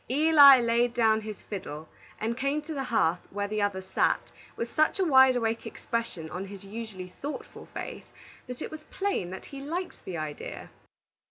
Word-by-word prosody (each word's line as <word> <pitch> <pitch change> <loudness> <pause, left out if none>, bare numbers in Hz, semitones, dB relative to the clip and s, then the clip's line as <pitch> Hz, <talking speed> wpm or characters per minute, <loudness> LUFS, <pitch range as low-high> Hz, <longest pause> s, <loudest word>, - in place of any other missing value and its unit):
Eli 285 -1 +8
laid 235 0 +2
down 220 -2 +3
his 215 -1 -8
fiddle 160 -6 -6 0.3
and 225 +2 -1
came 275 +4 0
to 315 - -6
the 270 -2 -3
hearth 175 -8 +1
where 205 +1 -2
the 215 0 -2
others 195 -2 -1
sat, 190 - +1 0.2
with 230 0 -4
such 310 +4 +3
a 380 - +2
wide 265 -4 +7
awake 230 -1 -1
expression 230 -9 -4
on 180 +3 -4
his 200 0 -10
usually 195 -4 -7
thoughtful 290 +2 -6
face - - -7 0.4
that 250 0 -6
it - - -6
was 310 0 -8
plain 390 - -2
that 190 +1 -8
he 275 -1 -9
liked 345 +6 -5
the 180 -3 -5
idea. 155 -1 -6
230 Hz, 180 wpm, -28 LUFS, 195-275 Hz, 0.4 s, Eli